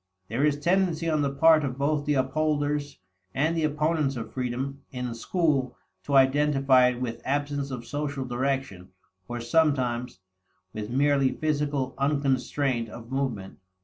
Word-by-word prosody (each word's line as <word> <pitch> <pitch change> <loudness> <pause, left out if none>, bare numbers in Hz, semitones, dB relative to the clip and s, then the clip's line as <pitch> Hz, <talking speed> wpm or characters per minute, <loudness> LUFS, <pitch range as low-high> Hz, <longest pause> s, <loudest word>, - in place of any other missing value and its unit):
There 120 +6 -1
is 150 -1 +3
tendency 175 +1 +1
on 155 -2 +1
the 140 - +1
part 155 +2 +5
of 130 -2 -3
both 145 +1 0
the 150 - +2
upholders 145 +1 0 0.4
and 160 +5 +1
the 165 - 0
opponents 150 -1 0
of 115 -2 -6
freedom 130 +2 -3
in 125 -2 -4
school 140 +1 0 0.3
to 140 - 0
identify 135 -1 +4
it 125 -1 -1
with 120 -2 -4
absence 145 0 -1
of 125 -3 -6
social 145 -1 -3
direction, 125 -7 -2 0.4
or, 120 0 -4
sometimes, 125 - +1 0.6
with 105 0 -5
merely 140 +1 +2
physical 145 -3 -1
unconstraint 135 -3 0
of 115 +2 -11
movement. 125 -8 -3
140 Hz, 145 wpm, -26 LUFS, 125-150 Hz, 0.6 s, part